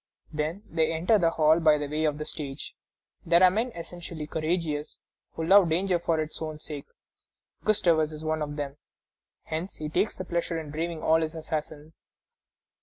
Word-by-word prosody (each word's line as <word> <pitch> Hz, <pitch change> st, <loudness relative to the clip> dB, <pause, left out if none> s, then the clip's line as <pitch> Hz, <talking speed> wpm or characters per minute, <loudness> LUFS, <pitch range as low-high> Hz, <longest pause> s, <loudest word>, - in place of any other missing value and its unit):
Then 155 Hz, +6 st, -2 dB
they 160 Hz, -2 st, +1 dB
enter 175 Hz, +7 st, +3 dB
the 170 Hz, -3 st, +4 dB
hall 160 Hz, 0 st, +4 dB
by 155 Hz, -2 st, +5 dB
way 150 Hz, +2 st, -1 dB
of 150 Hz, -1 st, +1 dB
the 150 Hz, -, -4 dB
stage. 140 Hz, -3 st, -6 dB, 0.5 s
There 170 Hz, +2 st, +5 dB
are 185 Hz, -, +8 dB
men 225 Hz, +6 st, 0 dB
essentially 170 Hz, -2 st, -7 dB
courageous, 155 Hz, -1 st, -2 dB, 0.4 s
who 160 Hz, -, -3 dB
love 190 Hz, 0 st, +7 dB
danger 180 Hz, +2 st, +2 dB
for 165 Hz, -1 st, 0 dB
its 155 Hz, +1 st, -4 dB
own 155 Hz, -1 st, -4 dB
sake. 150 Hz, -2 st, -8 dB, 0.8 s
Gustavus 170 Hz, -7 st, +3 dB
is 155 Hz, 0 st, -8 dB
one 155 Hz, 0 st, -1 dB
of 145 Hz, -1 st, -3 dB
them. 145 Hz, -1 st, -4 dB, 0.7 s
Hence 165 Hz, +5 st, -4 dB
he 155 Hz, 0 st, -5 dB
takes 190 Hz, +7 st, +1 dB
pleasure 170 Hz, -2 st, -2 dB
in 155 Hz, -2 st, -6 dB
braving 165 Hz, +1 st, -3 dB
all 160 Hz, +1 st, +4 dB
his 160 Hz, +1 st, -2 dB
assassins. 155 Hz, -1 st, -5 dB
160 Hz, 170 wpm, -28 LUFS, 155-170 Hz, 0.8 s, are